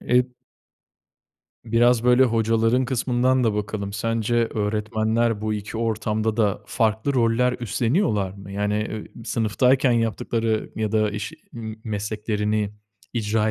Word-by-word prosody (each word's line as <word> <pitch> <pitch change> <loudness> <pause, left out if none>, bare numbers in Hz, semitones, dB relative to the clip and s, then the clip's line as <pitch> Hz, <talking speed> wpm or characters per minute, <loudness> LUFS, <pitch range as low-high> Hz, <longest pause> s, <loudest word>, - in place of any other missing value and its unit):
E 125 0 +3 1.4
Biraz, 120 +1 +3
böyle, 125 +1 +6
hocaların 115 +2 +2
kısmından 125 0 +1
da 110 -2 +2
bakalım, 105 -1 -3
sence 115 +1 -1
öğretmenler 110 0 0
bu 110 0 -1
2 105 +2 -5
ortamda 110 -1 -1
da 105 -4 +1
farklı 110 +4 0
roller 120 +1 +3
üstleniyorlar 115 - +1
mı? 100 0 -11
Yani, 105 +1 -1 0.4
eee, 115 - -10
sınıftayken 125 +4 +2
yaptıkları 115 -1 0
ya 110 -1 -1
da 110 -1 +2
iş 105 +1 -5 0.2
m 110 -2 -6
mesleklerini 105 0 -1 0.4
icra 110 -1 0
110 Hz, 120 wpm, -23 LUFS, 105-120 Hz, 1.4 s, böyle